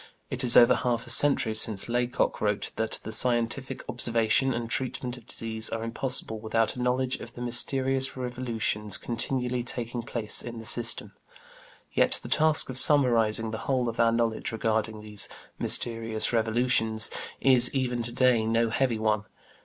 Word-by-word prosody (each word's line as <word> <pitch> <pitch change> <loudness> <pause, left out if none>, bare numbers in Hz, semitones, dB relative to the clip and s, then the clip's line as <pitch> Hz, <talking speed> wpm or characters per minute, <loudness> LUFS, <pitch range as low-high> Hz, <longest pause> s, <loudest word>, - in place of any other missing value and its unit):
It 130 0 -3
is 125 -1 +6
over 120 - +7
half 120 -2 -1
a 120 - -1
century 130 -4 +4
since 110 -2 -1
Laycock 120 +1 -1
wrote 105 -1 -1
that 110 0 -2
"the 110 - -6
scientific 125 +3 0
observation 115 +3 +1
and 120 -1 -3
treatment 125 +1 -4
of 120 -3 -16
disease 110 -1 -2
are 115 0 -4
impossible 115 -1 -2
without 115 +1 -1
a 125 - -5
knowledge 125 +1 0
of - - -11
the 120 - -10
mysterious 130 +2 0
revolutions 120 -5 -2
continually 125 +1 -2
taking 120 -1 -4
place 115 -2 -4
in 120 -1 -8
the 115 - -8
system"; 115 +1 -1 0.8
yet - - +3
the - - -8
task 155 0 +3
of 130 - +2
summarizing 115 -7 +3
the 110 - -5
whole 130 -2 +1
of 115 - -5
our 115 0 +4
knowledge 115 -1 -1
regarding 110 -1 -2
these 105 -1 +1 0.3
"mysterious 115 -1 +1
revolutions" 110 -1 +1 0.3
is 125 -2 +6
even 125 -3 -2
to 120 0 -4
day 125 -2 +2
no 115 +1 0
heavy 125 -1 0
one. 110 -1 0
120 Hz, 160 wpm, -27 LUFS, 110-125 Hz, 0.8 s, over